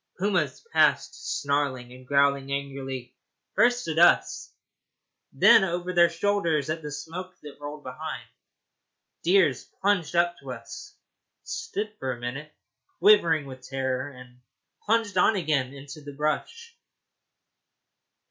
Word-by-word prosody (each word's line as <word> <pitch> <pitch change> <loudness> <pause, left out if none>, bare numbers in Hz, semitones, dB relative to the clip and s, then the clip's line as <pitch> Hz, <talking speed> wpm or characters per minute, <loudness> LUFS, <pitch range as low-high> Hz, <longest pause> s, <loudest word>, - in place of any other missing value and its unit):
Pumas 185 - -1
passed - - +1
snarling 140 -4 -1
and 130 0 -14
growling 140 -1 +2
angrily, 135 -2 -5 0.4
first 245 -1 +3
at 160 0 -1
us, 175 - +4 0.8
and - - -10
then 220 - +8
over 180 0 -2
their 170 -1 +6
shoulders 170 -5 0
at 160 +1 -3
the 150 -1 -6
smoke 180 +5 -7
that 145 -1 -11
rolled 145 0 -8
behind. 155 +5 -6 0.9
Deer 180 -4 +4 0.3
plunged 190 -4 +1
up 175 0 +3
to - - -7
us, - - -10 0.5
stood 215 - -4
for 130 -1 -2
a 120 - -10
minute 135 +6 -6 0.5
quivering 170 -8 +5
with 130 -1 -10
terror, 130 0 -3
and 125 -2 -14 0.5
plunged 215 -4 +1
on 220 - +4
again 150 -8 0
into 140 +2 -10
the 145 0 -9
brush. 460 - -3
150 Hz, 130 wpm, -26 LUFS, 135-185 Hz, 0.9 s, then